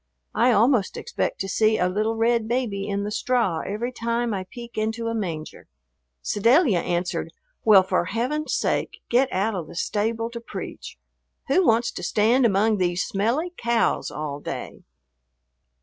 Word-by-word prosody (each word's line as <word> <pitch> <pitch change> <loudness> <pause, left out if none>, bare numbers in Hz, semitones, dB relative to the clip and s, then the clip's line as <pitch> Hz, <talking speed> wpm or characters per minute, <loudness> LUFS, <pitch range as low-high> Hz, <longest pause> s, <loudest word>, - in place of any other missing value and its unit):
I 240 +3 +4
almost 230 -2 +3
expect - - -3
to 195 - -2
see 215 +2 +2
a 180 - +2
little 215 +4 0
red 230 0 +1
baby 225 -5 -1
in 200 0 -1
the 205 - -3
straw 225 -7 0
every 220 +8 -3
time 235 -1 -1
I 190 -2 -4
peek 240 -2 -10
into 220 +2 -2
a - - -2
manger." 170 -8 -5 0.6
Sedalia 230 - +3
answered, 175 +1 -2 0.3
"Well, 205 -4 +7
for 185 -2 0
Heaven's 250 - -2
sake, - - -1
get 255 +2 +3
out 200 +4 0
of 175 -5 -4
the - - -11
stable 225 +5 -1
to 235 0 -7
preach. - - -8 0.5
Who 375 - +4
wants 230 +1 +3
to - - -7
stand 225 +7 +3
among 210 +1 +2
these 180 -1 0
smelly 245 - -1
cows 235 -1 +1
all 150 -2 -5
day?" - - -6
220 Hz, 160 wpm, -24 LUFS, 195-235 Hz, 0.6 s, Well